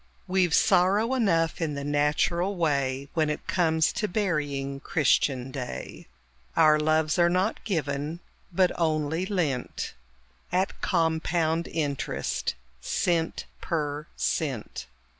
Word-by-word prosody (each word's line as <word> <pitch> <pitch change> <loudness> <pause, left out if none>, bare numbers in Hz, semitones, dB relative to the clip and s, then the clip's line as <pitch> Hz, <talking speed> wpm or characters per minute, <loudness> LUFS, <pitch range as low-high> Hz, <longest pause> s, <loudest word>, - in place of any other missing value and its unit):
We've 180 -3 +2
sorrow 200 +6 +3
enough 175 -10 +1
in 155 -3 -1
the 140 - -4
natural 150 +6 +1
way, 140 -5 0
When 155 -2 +1
it 150 - -3
comes 160 -3 +2
to 210 - -1
burying 145 -9 -1
Christian 135 -3 +1
clay. 130 -2 -6 0.5
Our 155 0 +6
loves 155 +1 +2
are 170 0 +5
not 185 +5 0
given, 155 -4 -2 0.3
but 180 +1 +3
only 160 +2 0
lent, 155 -11 -2 0.6
At 185 +2 0
compound 165 -1 +1
interest 145 -4 -2 0.3
of - - -11
cent 170 -2 0 0.2
per 150 -2 -2
cent. 135 -9 -2
160 Hz, 115 wpm, -27 LUFS, 145-175 Hz, 0.6 s, Our